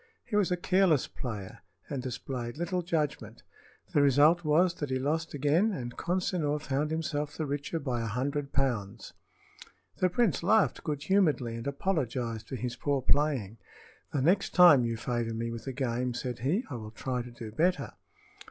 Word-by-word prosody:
He 230 - -4
was 205 -3 +3
a 180 - 0
careless 175 -5 +3
player, 105 -7 -7 0.3
and 140 -3 -3
displayed 125 -1 -5
little 175 +2 -1
judgment. 150 -9 -2 0.5
The 145 - +4
result 145 +5 +5
was 165 +4 +3
that 145 - -3
he 130 - 0
lost 155 +4 -1
again, 150 +10 +2
and 120 -7 -5
Consinor 175 -4 -1
found 145 0 -1
himself 150 -2 -2
the 155 - -1
richer 145 +3 -3
by 125 -5 -2
a 115 - -2
hundred 140 +5 -2
pounds. 120 -8 -2 0.8
The 185 - +2
prince 185 - +1
laughed 210 +4 +3
good 145 -2 -3
humoredly 155 -12 +2
and 115 +3 -6
apologized 125 - -2
for - - -5
his 125 0 -4
poor 140 0 -1
playing. 130 -8 +1 0.5
"The 140 - 0
next 190 +6 +2
time 160 -9 +8
you 115 -1 -2
favor 120 -1 -2
me 115 +1 -3
with 115 +3 -7
a - - -1
game," 125 -1 -2
said 125 -1 -4
he, 155 - 0
"I 125 - -3
will 110 -2 -7
try 125 +3 -3
to 120 - -8
do 115 -2 -9
better." 175 +9 0
140 Hz, 175 wpm, -29 LUFS, 120-165 Hz, 0.8 s, time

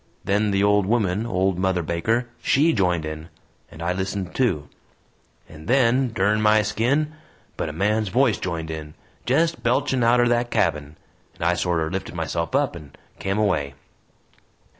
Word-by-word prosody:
Then 105 +2 +1
the 100 0 +1
old 105 -1 +3
woman 110 -1 0
old 95 -3 0
Mother 95 -2 0
Baker 110 +10 0
SHE 155 +5 +3
joined 90 -6 +1
in, 80 +1 -7 0.4
and 80 - -9
I 90 +1 0
listened 95 0 -4
too. 90 - 0 0.8
And 80 0 -13
then 125 0 +3
dern 105 +1 +1
my 105 0 +4
skin! 125 +9 0 0.4
but 80 - -3
a - - -4
man's 105 +6 0
voice 125 0 +2
joined 80 -3 -4
in 75 -1 -7 0.3
jest 160 +2 +1
belching 125 +1 +1
outer 120 +1 +4
that 120 0 +1
cabin! 75 -6 0 0.4
and - - -7
I 85 +1 +3
sorter 85 -2 -1
lifted 95 -1 -5
myself 85 - -2
up 140 -7 +1
and 75 -5 -12 0.2
kem 95 +1 -2
away. 75 -10 0
100 Hz, 160 wpm, -23 LUFS, 85-120 Hz, 0.8 s, my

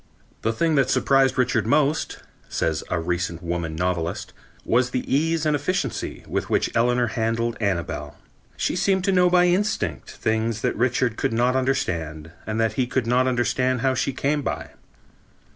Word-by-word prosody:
"The 115 - +1
thing 160 +8 +1
that 135 -3 +3
surprised 135 -1 +3
Richard 125 -1 +1
most," 150 +1 +1 0.3
says 80 -3 -1
a 90 - 0
recent 85 +1 -2
woman 85 -2 -3
novelist, 90 +2 -2 0.3
"was 125 +1 +2
the 125 0 -2
ease 160 +3 +1
and 150 - +2
the 145 - +1
efficiency 150 - -3
with - - -2
which - - 0
Eleanor 120 +1 +3
handled 115 +1 -1
Annabel.... 95 -5 -2 0.4
She - - 0
seemed 190 0 +1
to 195 - +2
know 180 -1 +4
by 180 0 +5
instinct, 175 - 0
things 110 0 -1
that - - 0
Richard 125 0 +1
could - - 0
not 120 +3 +2
understand 85 - -1 0.2
and 110 +1 -2
that 115 -1 +1
he 125 +2 0
could 130 -1 -1
not 125 +2 +2
understand 125 0 +1
how 130 +1 +2
she 130 +1 0
came 145 +3 0
by. - - -4
125 Hz, 170 wpm, -24 LUFS, 100-140 Hz, 0.4 s, by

